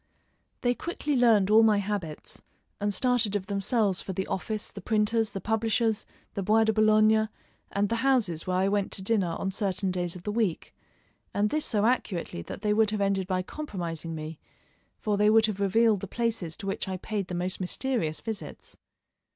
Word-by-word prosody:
They 245 0 +2
quickly 300 0 -3
learned 220 -5 +4
all 220 +1 +8
my 220 -2 +5
habits 200 -6 -4 0.4
and 205 0 0
started 240 -1 +2
of 195 -2 -1
themselves 200 0 +1
for 190 - -5
the 190 +1 -2
office, 215 +3 -3
the 200 - -9
printer's, 220 +2 +1
the 195 - -5
publishers', 225 +1 0 0.3
the 200 - -3
Bois 215 +4 +4
de 220 0 +2
Boulogne, 215 0 +4 0.4
and 200 +1 +1
the 230 - -1
houses 230 -12 +1
where 185 0 +1
I 190 +1 +2
went 200 -1 0
to 190 - -4
dinner 190 -5 +1
on 195 - -2
certain 190 -1 0
days 175 -1 -2
of 180 - -10
the 210 - -2
week, 210 -6 -1 0.6
and 205 +1 +2
this 305 0 0
so 210 -2 +1
accurately 195 - -1
that 195 - -8
they 210 0 +2
would 215 0 +3
have 210 0 -2
ended 195 -2 +1
by 185 -1 0
compromising 170 - -5
me, 155 0 -7 0.6
for 210 -2 -1
they 210 +1 +4
would 220 0 +6
have 210 -3 -3
revealed 210 +2 +3
the 200 - -6
places 225 -7 -2
to 205 - -8
which 195 - -2
I 190 -1 -3
paid 200 0 -3
the 180 - -4
most 180 +1 -2
mysterious 185 -4 -1
visits. 220 -2 -7
205 Hz, 190 wpm, -28 LUFS, 185-220 Hz, 0.6 s, all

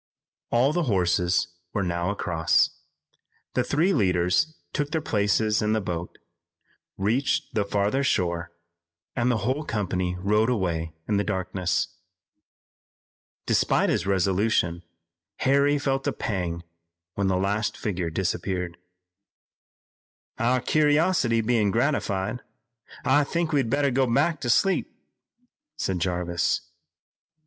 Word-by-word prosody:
All 130 +5 +3
the 175 -1 0
horses 90 -2 +2 0.3
were 100 - 0
now 85 0 -1
across. 85 -5 +2 0.8
The - - +1
three 170 +7 +2
leaders 95 - +2 0.2
took 145 -1 -1
their 160 - 0
places 105 -4 +1
in 105 0 +1
the 110 - +2
boat, 85 -3 -5 0.8
reached 115 +8 0
the 105 - +1
farther 105 +7 0
shore 85 -7 0 0.6
and 120 0 +1
the 110 -4 0
whole 135 +5 0
company 95 -7 -2
rode 105 +4 +2
away 85 -8 -1
in 105 - +1
the 100 - +1
darkness. 95 -2 -1 1.6
Despite - - +2
his - - -1
resolution 95 -2 +1 0.5
Harry 140 +2 +3
felt 135 -1 -1
a - - +1
pang 85 -5 -3 0.5
when 100 -1 0
the 95 -1 +2
last 100 +3 -1
figure 90 -5 -2
disappeared. 90 0 -2 1.6
"Our 125 +2 +2
curiosity 150 -5 +2
bein' 110 -2 +2
gratified, 115 -3 0 0.6
I 145 +2 +4
think 170 +3 -1
we'd 135 -6 +1
better 140 +1 +2
go 130 -1 +1
back 155 +6 +2
to 120 - -2
sleep," 195 +10 +2 0.9
said 95 -2 -1
Jarvis. 85 -1 0
105 Hz, 120 wpm, -25 LUFS, 90-130 Hz, 1.6 s, I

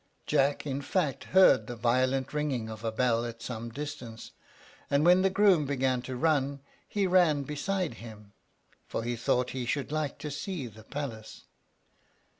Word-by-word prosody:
Jack, 140 +2 +1
in 140 -1 -2
fact, 145 0 -1
heard 180 - +5
the 120 - -5
violent 130 +4 +1
ringing 140 -7 -1
of 110 0 -8
a 115 - -1
bell 115 0 +1
at 115 -1 -6
some 115 -1 -5
distance; 120 -4 -7 0.6
and 140 +2 +3
when 180 +1 +6
the 195 - +3
groom 190 -6 +4
began 130 -2 0
to 130 +1 -6
run, 140 0 +1 0.3
he 205 -1 0
ran 175 -6 +4
beside 160 +3 -2
him, 105 -3 -11 0.5
for - - -3
he 120 +1 -2
thought 125 +2 0
he 130 -1 -3
should 140 +2 -2
like 155 -2 -2
to 150 - -6
see 155 0 -4
the 110 -1 -11
palace. 115 -5 -6
135 Hz, 165 wpm, -29 LUFS, 120-150 Hz, 0.6 s, when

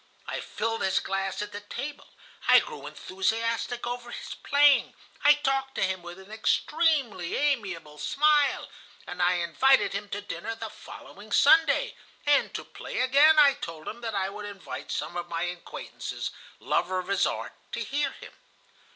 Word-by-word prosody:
I - - -4
filled 225 0 -3
his 190 - +2
glass 195 +1 -2
at 210 - -8
the 205 - -6
table, 275 +8 -7 0.4
I - - +8
grew 460 -2 -7
enthusiastic 230 +5 -2
over 240 0 -5
his - - -7
playing, 285 0 +4 0.3
I 290 - +8
talked 270 -2 -1
to - - 0
him 190 -1 -1
with 175 +1 -9
an 190 +2 -14
extremely 260 - +1
amiable 195 - -1
smile, 290 - +2 0.4
and 180 - -5
I 175 +1 +4
invited 180 +12 +3
him 200 +1 -4
to 200 - -3
dinner 205 +3 -5
the 225 -1 -6
following 205 +2 -12
Sunday, 295 +2 +5 0.3
and 290 -1 +3
to - - -3
play - - -8
again. 285 +5 +5
I 285 -2 +7
told 165 -7 -8
him 235 +2 -6
that 225 -2 -4
I 190 -1 0
would 210 +1 -7
invite 200 -2 -8
some 175 - -3
of 175 0 -4
my 165 0 -2
acquaintances, 175 0 -5 0.3
lovers 185 0 0
of - - -16
his 200 -1 +3
art, - - -4 0.2
to - - -2
hear 290 +1 0
him. - - -12
220 Hz, 170 wpm, -27 LUFS, 185-280 Hz, 0.4 s, I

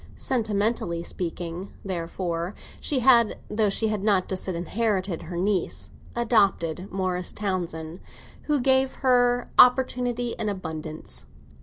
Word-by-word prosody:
Sentimentally 210 -7 0
speaking, 175 +1 -4
therefore, 170 0 -3 0.2
she 270 -4 0
had 235 -3 +5
(though 210 -1 +2
she 220 +3 +1
had 215 -2 -1
not 200 -4 +2
disinherited 190 +1 -1
her 170 +1 -6
niece) 190 0 -1 0.2
adopted 200 -6 +1
Morris 185 -2 -1
Townsend, 175 -4 -3 0.5
who 295 -2 +2
gave 265 +1 +4
her 245 -1 +3
opportunity 245 -1 +4
in 215 -2 0
abundance. 160 -5 -5
200 Hz, 110 wpm, -25 LUFS, 175-235 Hz, 0.5 s, had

